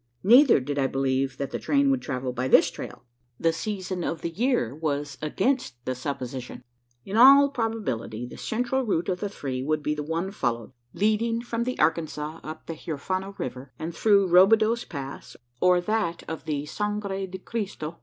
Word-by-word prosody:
Neither 245 Hz, -, +7 dB
did 140 Hz, +2 st, -3 dB
I 135 Hz, -, +2 dB
believe 135 Hz, 0 st, 0 dB
that 140 Hz, 0 st, -4 dB
the -, -, -3 dB
train 280 Hz, -1 st, +2 dB
would 265 Hz, -2 st, +1 dB
travel 130 Hz, -2 st, -3 dB
by 125 Hz, +1 st, -2 dB
this -, -, +5 dB
trail. -, -, -8 dB, 0.4 s
The 165 Hz, 0 st, +2 dB
season 185 Hz, -1 st, -3 dB
of 165 Hz, -1 st, -3 dB
the 170 Hz, -, -3 dB
year 230 Hz, -, 0 dB
was 145 Hz, -2 st, -3 dB
against 190 Hz, -, 0 dB
the 130 Hz, -, -1 dB
supposition. 130 Hz, -1 st, -5 dB, 0.4 s
In 200 Hz, +3 st, -3 dB
all 275 Hz, +3 st, +8 dB
probability, 210 Hz, -, -3 dB
the 125 Hz, -, -10 dB
central 250 Hz, +3 st, -1 dB
route 190 Hz, -8 st, -1 dB
of 180 Hz, -1 st, -1 dB
the 205 Hz, -, -2 dB
three 135 Hz, -9 st, -4 dB
would 150 Hz, +2 st, -1 dB
be 150 Hz, -, 0 dB
the 150 Hz, -, -4 dB
one 165 Hz, +5 st, -2 dB
followed 120 Hz, -, -2 dB, 0.2 s
leading 220 Hz, +4 st, +1 dB
from 235 Hz, -1 st, -2 dB
the 255 Hz, -, -2 dB
Arkansas 155 Hz, 0 st, 0 dB
up 155 Hz, 0 st, -8 dB
the 165 Hz, -, -5 dB
Huerfano 185 Hz, +6 st, -4 dB
river, 130 Hz, +1 st, -6 dB
and 165 Hz, +1 st, -5 dB
through 200 Hz, -3 st, +4 dB
"Robideau's 215 Hz, +6 st, +5 dB
Pass," 140 Hz, -3 st, -7 dB, 0.2 s
or 180 Hz, +3 st, +4 dB
that 175 Hz, -2 st, -1 dB
of 160 Hz, -, -6 dB
the 145 Hz, -1 st, -2 dB
"Sangre 200 Hz, +1 st, -3 dB
de 190 Hz, +1 st, -7 dB
Cristo." 185 Hz, -6 st, -5 dB
170 Hz, 180 wpm, -26 LUFS, 140-215 Hz, 0.4 s, all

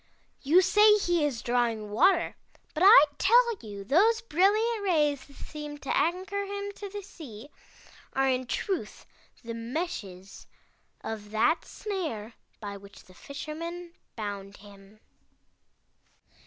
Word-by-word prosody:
You 335 Hz, +7 st, +5 dB
say 420 Hz, +3 st, +6 dB
he 350 Hz, -5 st, +1 dB
is 270 Hz, -6 st, -2 dB
drawing 235 Hz, -3 st, 0 dB
water, 345 Hz, -, +3 dB, 0.4 s
but 310 Hz, -, -4 dB
I 390 Hz, -7 st, +10 dB, 0.2 s
tell 470 Hz, +3 st, +4 dB
you 205 Hz, -3 st, -8 dB
those 415 Hz, -, +3 dB
brilliant 430 Hz, +4 st, +2 dB
rays 300 Hz, -7 st, +1 dB
that 280 Hz, -, -18 dB
seem 295 Hz, -1 st, -8 dB
to 280 Hz, -, -3 dB
anchor 370 Hz, +5 st, 0 dB
him 400 Hz, 0 st, -5 dB
to 405 Hz, -, -7 dB
the 410 Hz, +1 st, -7 dB
sea, 280 Hz, -, -11 dB, 0.6 s
are 270 Hz, 0 st, +2 dB
in 255 Hz, -1 st, 0 dB
truth 385 Hz, -, -3 dB, 0.4 s
the 230 Hz, 0 st, -6 dB
meshes 230 Hz, -, -6 dB, 0.5 s
of 210 Hz, -2 st, -6 dB
that 220 Hz, +10 st, +1 dB
snare 310 Hz, -, -5 dB, 0.3 s
by 200 Hz, -1 st, -6 dB
which 200 Hz, 0 st, -15 dB
the 185 Hz, -, -19 dB
Fisherman 335 Hz, -, -7 dB, 0.2 s
bound 200 Hz, -2 st, -6 dB
him." 200 Hz, +1 st, -17 dB
295 Hz, 130 wpm, -28 LUFS, -, 0.6 s, I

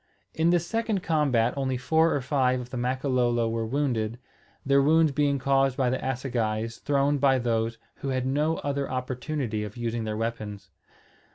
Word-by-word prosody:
In 160 Hz, +1 st, +2 dB
this 175 Hz, -1 st, +2 dB
second 225 Hz, -1 st, -1 dB
combat 135 Hz, -7 st, +2 dB
only 130 Hz, -2 st, -1 dB
four 160 Hz, +5 st, +2 dB
or 140 Hz, -, -1 dB
five 130 Hz, -2 st, +1 dB
of 125 Hz, 0 st, -8 dB
the -, -, -5 dB
Makololo 125 Hz, -2 st, +1 dB
were 115 Hz, 0 st, -2 dB
wounded; 120 Hz, -4 st, -1 dB, 0.5 s
their 140 Hz, 0 st, +4 dB
wounds 155 Hz, +2 st, +4 dB
being 140 Hz, 0 st, +1 dB
caused 135 Hz, 0 st, +2 dB
by 130 Hz, -3 st, +2 dB
assegais 120 Hz, -4 st, -2 dB
thrown 140 Hz, 0 st, +1 dB
by 135 Hz, -1 st, +4 dB
those 115 Hz, -2 st, -1 dB, 0.2 s
who -, -, -6 dB
had 130 Hz, -1 st, -1 dB
no 150 Hz, +4 st, +1 dB
other 140 Hz, -1 st, -2 dB
opportunity 125 Hz, -2 st, -3 dB
of 105 Hz, +2 st, -8 dB
using 120 Hz, -1 st, -2 dB
their 110 Hz, -1 st, -3 dB
weapons. 105 Hz, -3 st, -4 dB
130 Hz, 165 wpm, -27 LUFS, 115-140 Hz, 0.5 s, their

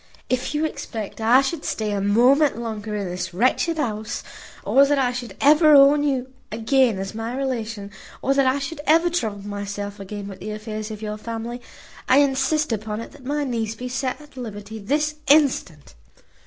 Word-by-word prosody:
If 255 Hz, +3 st, -1 dB
you 305 Hz, +1 st, +1 dB
expect 225 Hz, -8 st, -5 dB
I 240 Hz, +4 st, +6 dB
should 285 Hz, +3 st, -3 dB
stay 215 Hz, -1 st, -2 dB
a 200 Hz, -1 st, -1 dB
moment 250 Hz, +9 st, +4 dB
longer 220 Hz, -2 st, -4 dB
in 200 Hz, -2 st, -2 dB
this 180 Hz, 0 st, -5 dB
wretched 260 Hz, -, +2 dB
house, 220 Hz, -7 st, -3 dB, 0.4 s
or 275 Hz, -, +5 dB
that 285 Hz, +1 st, +2 dB
I 255 Hz, -2 st, +2 dB
should 240 Hz, -5 st, -6 dB
ever 305 Hz, +1 st, +6 dB
own 280 Hz, +1 st, +7 dB
you 265 Hz, -3 st, -1 dB, 0.2 s
again 230 Hz, 0 st, +2 dB
as 195 Hz, +2 st, -5 dB
my 225 Hz, +3 st, -4 dB
relation, 225 Hz, -6 st, -3 dB, 0.3 s
or 275 Hz, -, +1 dB
that 275 Hz, -1 st, +3 dB
I 260 Hz, +2 st, +2 dB
should 290 Hz, +2 st, -5 dB
ever 330 Hz, +3 st, +4 dB
trouble 215 Hz, -, -2 dB
myself 205 Hz, 0 st, -5 dB
again 200 Hz, +1 st, -6 dB
with 195 Hz, -2 st, -9 dB
the -, -, -6 dB
affairs 215 Hz, 0 st, -5 dB
of 215 Hz, 0 st, -7 dB
your 210 Hz, 0 st, -4 dB
family, 230 Hz, +2 st, -6 dB, 0.5 s
I 260 Hz, -, +6 dB
insist 280 Hz, +1 st, +2 dB
upon 215 Hz, -1 st, -3 dB
it 230 Hz, -, -8 dB
that 280 Hz, -3 st, -16 dB
my 290 Hz, +2 st, -1 dB
niece 225 Hz, -4 st, -2 dB
be 250 Hz, +2 st, -6 dB
set 255 Hz, +2 st, -2 dB
at 295 Hz, -2 st, -16 dB
liberty 220 Hz, -2 st, -7 dB
this 300 Hz, +8 st, -1 dB
instant." 275 Hz, -, +2 dB
240 Hz, 185 wpm, -23 LUFS, 210-275 Hz, 0.5 s, own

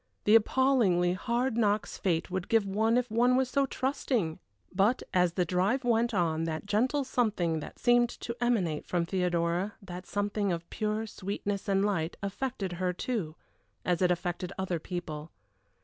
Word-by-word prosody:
The 210 Hz, -, +4 dB
appallingly 225 Hz, -7 st, +4 dB
hard 240 Hz, +5 st, -1 dB
knocks 210 Hz, -1 st, +1 dB
fate 175 Hz, -2 st, 0 dB
would 185 Hz, -1 st, -2 dB
give 225 Hz, -3 st, +3 dB
one 220 Hz, +4 st, +2 dB
if 250 Hz, -2 st, -1 dB
one 245 Hz, +3 st, +4 dB
was 255 Hz, -1 st, +1 dB
so 275 Hz, -1 st, +2 dB
trusting! 255 Hz, -, -1 dB, 0.3 s
But 205 Hz, +7 st, +2 dB
as 180 Hz, -2 st, +3 dB
the 180 Hz, -1 st, +1 dB
drive 190 Hz, +10 st, +1 dB
went 235 Hz, 0 st, +2 dB
on 165 Hz, -5 st, 0 dB
that 160 Hz, +3 st, -3 dB
gentle 250 Hz, +8 st, +1 dB
something 205 Hz, -11 st, 0 dB
that 150 Hz, -, -9 dB
seemed 240 Hz, -1 st, +4 dB
to 235 Hz, -, -4 dB
emanate 185 Hz, -11 st, 0 dB
from 175 Hz, -2 st, 0 dB
Theodora, 175 Hz, +1 st, 0 dB
the 180 Hz, -2 st, -8 dB
something 205 Hz, -1 st, -1 dB
of 170 Hz, 0 st, -3 dB
pure 215 Hz, 0 st, -1 dB
sweetness 200 Hz, -1 st, -4 dB
and 195 Hz, 0 st, +3 dB
light, 170 Hz, -5 st, -1 dB
affected 200 Hz, -1 st, -3 dB
her, 180 Hz, -1 st, +1 dB
too, 180 Hz, -6 st, -3 dB, 0.5 s
as 180 Hz, -1 st, +1 dB
it 180 Hz, -, +4 dB
affected 175 Hz, +1 st, -2 dB
other 185 Hz, -3 st, -1 dB
people. 160 Hz, -3 st, -6 dB
200 Hz, 165 wpm, -30 LUFS, 175-235 Hz, 0.5 s, The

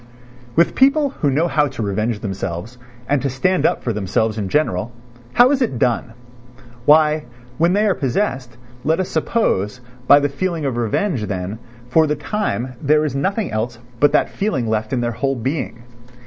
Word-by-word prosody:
III -, -, -22 dB, 0.5 s
With 170 Hz, +1 st, +4 dB
people 280 Hz, +2 st, +4 dB
who 145 Hz, -, +3 dB
know 155 Hz, +6 st, +2 dB
how 150 Hz, -3 st, +2 dB
to 135 Hz, -4 st, -5 dB
revenge 105 Hz, +2 st, -1 dB
themselves 95 Hz, +3 st, -5 dB, 0.3 s
and 145 Hz, -2 st, +1 dB
to 140 Hz, -, -1 dB
stand 180 Hz, +9 st, +1 dB
up -, -, -2 dB
for 120 Hz, -, -1 dB
themselves 105 Hz, +2 st, -1 dB
in 100 Hz, -2 st, -3 dB
general, 110 Hz, -5 st, 0 dB, 0.4 s
how 245 Hz, +2 st, +6 dB
is 280 Hz, -2 st, +1 dB
it 225 Hz, -, 0 dB
done? 120 Hz, -2 st, 0 dB, 0.7 s
Why, 155 Hz, 0 st, +4 dB, 0.3 s
when 170 Hz, +2 st, +3 dB
they 210 Hz, +2 st, +2 dB
are 200 Hz, -, +3 dB
possessed, 130 Hz, -, -2 dB, 0.3 s
let 160 Hz, +3 st, +1 dB
us 185 Hz, -, -1 dB
suppose, 125 Hz, -, 0 dB, 0.3 s
by 145 Hz, -, +8 dB
the 145 Hz, -, +1 dB
feeling 165 Hz, +2 st, -3 dB
of 135 Hz, -3 st, -1 dB
revenge, 120 Hz, -, -1 dB
then 95 Hz, +2 st, -4 dB, 0.3 s
for 155 Hz, +6 st, +3 dB
the 150 Hz, -, 0 dB
time 145 Hz, -, -2 dB
there 150 Hz, +1 st, +3 dB
is 140 Hz, -3 st, -3 dB
nothing 195 Hz, +8 st, -1 dB
else 115 Hz, +2 st, -2 dB, 0.2 s
but 145 Hz, +2 st, +5 dB
that -, -, +2 dB
feeling 165 Hz, -, -1 dB
left 110 Hz, +1 st, -1 dB
in 130 Hz, -3 st, 0 dB
their 120 Hz, 0 st, -1 dB
whole 135 Hz, +4 st, -1 dB
being. 125 Hz, -1 st, -3 dB
135 Hz, 185 wpm, -20 LUFS, 115-160 Hz, 0.7 s, by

